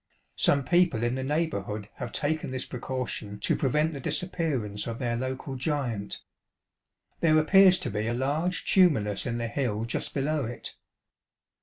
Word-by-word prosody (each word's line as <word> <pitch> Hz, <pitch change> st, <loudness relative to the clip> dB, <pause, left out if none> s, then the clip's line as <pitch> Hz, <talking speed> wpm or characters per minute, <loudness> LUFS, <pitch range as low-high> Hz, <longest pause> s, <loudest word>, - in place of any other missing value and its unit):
Some 140 Hz, -1 st, +4 dB
people 170 Hz, -5 st, +3 dB
in 120 Hz, +1 st, +1 dB
the 130 Hz, -, -2 dB
neighbourliood 110 Hz, -9 st, -2 dB
have -, -, -5 dB
taken 155 Hz, 0 st, -1 dB
this 130 Hz, 0 st, -3 dB
precaution 120 Hz, -5 st, -4 dB
to -, -, +2 dB
prevent 150 Hz, +4 st, +1 dB
the 140 Hz, -, -5 dB
disappearance 135 Hz, -, -2 dB
of 115 Hz, -1 st, -4 dB
their 120 Hz, -2 st, -1 dB
local 130 Hz, +2 st, -4 dB
giant. 125 Hz, -7 st, -2 dB, 1.0 s
There 155 Hz, -2 st, +4 dB
appears 185 Hz, +4 st, +6 dB
to -, -, -2 dB
be 105 Hz, +2 st, -2 dB
a 120 Hz, -, 0 dB
large 150 Hz, +6 st, -1 dB
tumulus 130 Hz, -, +3 dB
in 120 Hz, -1 st, -2 dB
the 115 Hz, 0 st, -2 dB
hill 115 Hz, -3 st, -1 dB
just 115 Hz, -, -3 dB
below 145 Hz, 0 st, 0 dB
it. 120 Hz, +2 st, -6 dB
130 Hz, 155 wpm, -28 LUFS, 115-155 Hz, 1.0 s, appears